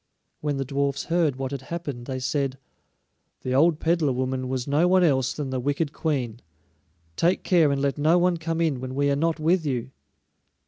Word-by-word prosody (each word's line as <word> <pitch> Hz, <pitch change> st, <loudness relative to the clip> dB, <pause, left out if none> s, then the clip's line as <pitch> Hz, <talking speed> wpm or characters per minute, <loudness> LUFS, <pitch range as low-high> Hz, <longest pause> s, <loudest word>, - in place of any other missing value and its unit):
When 145 Hz, -2 st, -2 dB
the 135 Hz, -, -2 dB
dwarfs 140 Hz, 0 st, -1 dB
heard 165 Hz, -5 st, +1 dB
what 135 Hz, 0 st, -4 dB
had 140 Hz, -2 st, -4 dB
happened 140 Hz, -5 st, -6 dB
they 130 Hz, -1 st, -3 dB
said: 135 Hz, +1 st, -1 dB, 0.8 s
"The 130 Hz, -, -2 dB
old 155 Hz, +3 st, +4 dB
peddler 165 Hz, -4 st, +1 dB
woman 130 Hz, 0 st, -2 dB
was 130 Hz, 0 st, -2 dB
no 150 Hz, +5 st, +3 dB
one 185 Hz, 0 st, +4 dB
else 130 Hz, -5 st, +2 dB
than 140 Hz, -2 st, -4 dB
the 130 Hz, -, -1 dB
wicked 145 Hz, +4 st, -1 dB
Queen; 125 Hz, -8 st, -2 dB, 0.7 s
take 175 Hz, +3 st, +1 dB
care 165 Hz, -5 st, +4 dB
and 140 Hz, -, 0 dB
let 140 Hz, +1 st, -1 dB
no 160 Hz, +4 st, +4 dB
one 175 Hz, 0 st, +2 dB
come 165 Hz, 0 st, -2 dB
in 155 Hz, -6 st, +1 dB
when 130 Hz, 0 st, -6 dB
we 140 Hz, 0 st, +2 dB
are -, -, +2 dB
not 165 Hz, +2 st, 0 dB
with 165 Hz, +3 st, +2 dB
you." 130 Hz, -3 st, -2 dB
140 Hz, 195 wpm, -25 LUFS, 130-165 Hz, 0.8 s, old